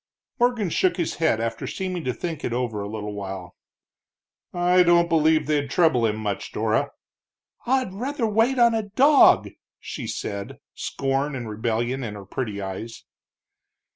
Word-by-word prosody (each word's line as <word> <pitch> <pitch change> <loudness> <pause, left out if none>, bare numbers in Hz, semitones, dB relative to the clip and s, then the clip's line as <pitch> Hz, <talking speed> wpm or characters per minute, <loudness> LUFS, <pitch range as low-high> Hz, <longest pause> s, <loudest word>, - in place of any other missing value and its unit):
Morgan 240 -7 +1
shook 180 +2 +2
his 170 -3 -2
head 155 -8 +2
after 115 0 -3
seeming 185 -3 -4
to 125 - +1
think 165 +3 -5
it 115 - -2
over 120 -4 -2
a 100 - -5
little 105 -1 -5
while. 95 -3 -7 1.0
"I 180 +1 +3
don't 170 -1 +5
believe 160 -1 +3
they'd 145 -2 0
trouble 140 -8 +3
him 105 - -1
much, 105 -2 -4
Dora." - - 0 0.8
"I'd 255 -6 +1
rather 255 +5 -2
wait 225 +5 +2
on 235 -1 +5
a 225 - +1
dog!" 275 +7 +5 0.3
she - - -6
said, 100 0 -5 0.2
scorn 135 +1 -2
and 120 -3 -5
rebellion 115 +4 -2
in 105 -3 -5
her 100 -1 -9
pretty 105 0 -4
eyes. 100 +4 -6
145 Hz, 155 wpm, -24 LUFS, 110-185 Hz, 1.0 s, don't